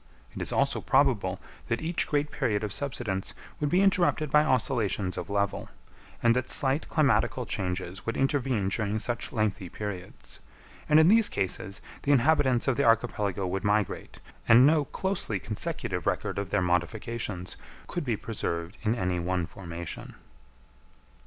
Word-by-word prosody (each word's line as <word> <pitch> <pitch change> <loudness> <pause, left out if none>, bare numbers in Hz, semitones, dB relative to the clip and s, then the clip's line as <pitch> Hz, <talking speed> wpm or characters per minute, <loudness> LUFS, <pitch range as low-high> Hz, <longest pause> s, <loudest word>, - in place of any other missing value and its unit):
It - - -5
is - - 0
also - - +1
probable - - +2 0.3
that 115 0 0
each 165 +2 -1
great 145 0 0
period 120 -9 0
of 105 -2 -2
subsidence 115 -9 -3 0.2
would 150 - 0
be 180 +4 +3
interrupted 175 -6 +2
by 150 0 +6
oscillations 110 -8 0
of - - -5
level, 100 0 -1 0.5
and 120 0 +5
that 130 0 -1
slight 135 +3 +1
climatical 130 -4 +2
changes 90 0 -3
would 115 - -3
intervene 130 -7 +1
during 105 0 0
such 120 +2 -3
lengthy 105 -5 -1
periods; 95 -2 -7 0.5
and 150 +1 +7
in 160 - +6
these 220 +3 +5
cases 95 +1 -3 0.2
the 145 - +1
inhabitants 135 -2 +3
of 130 -3 +2
the - - +2
archipelago 105 -4 +1
would 95 +2 -2
migrate, 105 -1 -1 0.3
and 120 +3 +8
no 150 0 +4
closely 190 - -2
consecutive 105 +2 -4
record - - -1
of 100 -1 -4
their 95 - +1
modifications 90 +1 -2 0.3
could 175 - -4
be 120 -6 -1
preserved 90 -4 -4
in 110 +1 +1
any 90 -5 -1
one 90 0 -1
formation. 85 -2 -7
115 Hz, 150 wpm, -28 LUFS, 95-140 Hz, 0.5 s, and